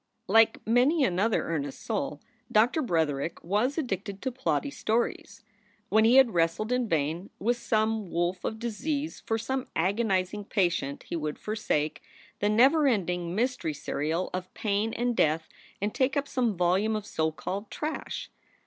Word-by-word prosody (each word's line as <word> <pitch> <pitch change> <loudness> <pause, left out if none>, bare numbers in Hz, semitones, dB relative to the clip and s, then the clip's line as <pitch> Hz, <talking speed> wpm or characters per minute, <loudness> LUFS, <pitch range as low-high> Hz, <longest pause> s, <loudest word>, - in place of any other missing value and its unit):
Like 225 +3 +5
many 255 +7 +4
another 210 0 +2
earnest 145 -4 -3
soul, 145 +1 -2 0.3
Doctor 235 +9 +4
Bretherick 160 - -1
was 215 - 0
addicted 200 - -3
to 260 - -1
plotty 260 +3 -1
stories. 225 +2 -2 0.5
When 220 +1 +4
he 235 +3 +5
had 265 -5 +6
wrestled 170 +7 +1
in 250 -2 +1
vain 160 +4 -1
with 240 +4 0
some 220 -3 0
wolf 175 +2 -1
of 220 - -2
disease 280 +7 -3
for 225 - +1
some 260 +3 -3
agonizing 195 +1 0
patient 175 -9 0
he - - -5
would 155 -2 -3
forsake 155 -8 -1 0.4
the 205 - +2
never 270 +8 +5
ending 180 -6 0
mystery 235 - -1
serial 155 +6 -2
of 185 0 -4
pain 210 +1 0
and 240 0 0
death 160 -2 +2 0.3
and 205 +2 -1
take 265 +1 +1
up 285 0 0
some 240 -8 0
volume 185 +5 +2
of 210 -1 -3
so 160 -5 0
called 200 +6 -5
"trash." 310 +1 -4
210 Hz, 155 wpm, -28 LUFS, 175-240 Hz, 0.5 s, had